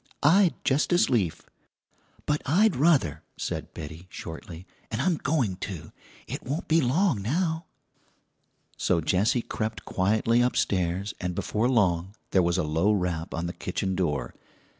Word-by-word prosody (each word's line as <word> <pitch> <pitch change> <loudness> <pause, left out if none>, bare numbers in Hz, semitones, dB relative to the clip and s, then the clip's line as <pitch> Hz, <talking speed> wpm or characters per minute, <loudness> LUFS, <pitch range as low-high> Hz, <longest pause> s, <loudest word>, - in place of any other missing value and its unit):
"I'd 175 +4 +5
just 140 +5 +2
as 175 - +3
lief." 100 -10 0 0.8
"But 150 0 0
I'd 190 +7 +4
ruther," 130 - +3 0.2
said - - -4
Betty 80 +3 -8
shortly 80 +1 -8 0.3
"'n' 110 - -2
I'm 165 +4 +2
going 125 - 0
to; 90 -3 -6 0.3
it - - -5
won't 145 +6 -4
be 165 +1 +4
long 135 - +2
now." 160 - -1 1.1
So 90 - +2
Jessie 100 +9 +2
crept 110 0 -4
quietly 110 +5 +2
upstairs, 95 -5 0
and 90 -1 -2
before 110 +7 0
long 95 -5 +1 0.2
there 95 - +4
was 85 0 +1
a 90 - +1
low 80 +7 +2
rap 90 -5 -1
on 85 +1 -2
the 85 - -3
kitchen 95 -1 -2
door. 85 -6 -1
105 Hz, 145 wpm, -27 LUFS, 90-140 Hz, 1.1 s, I'd